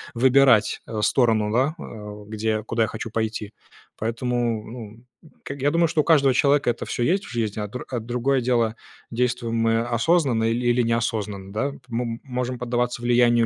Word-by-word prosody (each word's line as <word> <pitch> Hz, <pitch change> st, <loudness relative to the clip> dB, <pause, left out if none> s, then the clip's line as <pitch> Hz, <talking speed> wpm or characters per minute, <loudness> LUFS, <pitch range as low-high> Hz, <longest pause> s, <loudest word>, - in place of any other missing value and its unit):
выбирать, 130 Hz, -2 st, +4 dB
э, 110 Hz, -2 st, -3 dB
сторону, 110 Hz, -4 st, +2 dB
да, 135 Hz, +6 st, +2 dB
э, 105 Hz, -1 st, -9 dB
где 110 Hz, +1 st, -3 dB
я 110 Hz, 0 st, 0 dB
куда 115 Hz, +1 st, 0 dB
я 110 Hz, -, 0 dB
хочу 110 Hz, 0 st, -6 dB
пойти. 110 Hz, -1 st, -3 dB, 0.4 s
Поэтому, 115 Hz, 0 st, -1 dB
ну, 115 Hz, -1 st, -10 dB, 0.4 s
к -, -, -5 dB
я 140 Hz, +1 st, 0 dB
думаю, 170 Hz, +1 st, +3 dB
что 155 Hz, -, +1 dB
у -, -, -4 dB
каждого 140 Hz, -5 st, +4 dB
человека 140 Hz, +1 st, +3 dB
это 120 Hz, -, -2 dB
всё 120 Hz, -, -2 dB
есть 190 Hz, +9 st, +1 dB
в -, -, -10 dB
жизни, 110 Hz, -3 st, -2 dB
а 105 Hz, -, -3 dB
др 125 Hz, +5 st, -7 dB
а 125 Hz, -, -2 dB
другое 125 Hz, +4 st, 0 dB
дело, 120 Hz, -2 st, +1 dB, 0.4 s
действуем 120 Hz, -1 st, -1 dB
мы 115 Hz, 0 st, +2 dB
осознанно 120 Hz, 0 st, +1 dB
или 120 Hz, +2 st, 0 dB
или 120 Hz, +1 st, +3 dB
неосознанно, 110 Hz, -4 st, -2 dB
да. 110 Hz, +6 st, 0 dB
М 140 Hz, -, -11 dB
мы 115 Hz, -1 st, -3 dB
можем 125 Hz, -1 st, -3 dB
поддаваться 120 Hz, 0 st, -1 dB
влиянию 120 Hz, -1 st, +4 dB
120 Hz, 185 wpm, -23 LUFS, 110-125 Hz, 0.4 s, выбирать